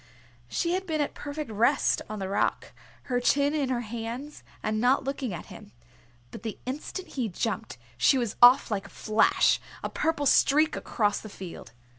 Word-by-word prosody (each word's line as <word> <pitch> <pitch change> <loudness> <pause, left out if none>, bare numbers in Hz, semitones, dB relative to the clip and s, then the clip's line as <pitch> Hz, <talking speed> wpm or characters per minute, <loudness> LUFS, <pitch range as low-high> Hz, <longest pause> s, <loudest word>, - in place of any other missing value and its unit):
She 335 - -1
had 380 +1 -2
been 315 -2 -1
at 290 - -1
perfect 290 -3 -6
rest 235 +7 +2
on 215 - -5
the 195 -2 -3
rock, 195 - -1 0.3
her 245 -2 -1
chin 280 +3 +2
in 285 -4 0
her 245 -2 0
hands, 235 +6 -6 0.2
and 215 0 -1
not 255 +3 +3
looking 270 -3 -3
at 175 - -6
him, 105 - -13 0.6
but - - -9
the 220 -2 -5
instant 300 +8 -5
he 245 -5 -2
jumped 190 - -3 0.2
she 270 - +5
was 235 -4 -2
off 245 0 +7
like 195 -2 -2
a - - -16
flash, 215 +5 +3 0.2
a - - -3
purple 310 -2 0
streak 300 +3 +4
across 205 -2 0
the 215 - -9
field. 175 - -9
245 Hz, 180 wpm, -27 LUFS, 215-285 Hz, 0.6 s, off